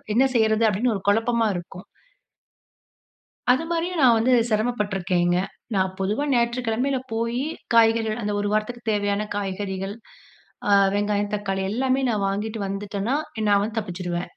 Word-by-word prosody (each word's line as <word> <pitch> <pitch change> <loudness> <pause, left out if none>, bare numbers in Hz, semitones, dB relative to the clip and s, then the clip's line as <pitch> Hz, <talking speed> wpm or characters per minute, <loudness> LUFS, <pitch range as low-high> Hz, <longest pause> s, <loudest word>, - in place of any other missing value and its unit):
என்ன 260 - +5
செய்யுறது? 220 -1 +3
அப்டீன்னு 220 +3 0
ஒரு 195 - -4
குழப்பமா 225 +2 +2
இருக்கும். 180 +1 -8 1.7
அது 270 +6 0
மாதிரியும் 340 0 -1
நான் 240 -3 +6
வந்து 240 +3 +2 0.2
சிரமப்பட்டுருக்கேங்க. 195 -6 0 0.4
நான் 190 -1 0
பொதுவா 210 +9 0
ஞாயிற்றுக்கிழமையில 240 +2 0
போயி 235 +3 -1 0.3
காய்கறிகள் 225 0 +3
அந்த 210 0 -1
ஒரு 205 - -1
வாரத்துக்கு 215 +3 -1
தேவையான 205 0 0
காய்கறிகள் 195 0 -3 0.8
அ - - +4 0.2
வெங்காயம் 205 0 0
தக்காளி 195 -2 -2
எல்லாமே 260 +4 +1
நான் 210 -4 0
வாங்கிட்டு 210 +3 -3
வந்துட்டேனா, 200 +4 -3 0.3
நான் 200 -1 +4
வந்து 215 +1 -4
தப்பிச்சுடுவேன். 180 -3 -4
215 Hz, 130 wpm, -24 LUFS, 195-235 Hz, 1.7 s, நான்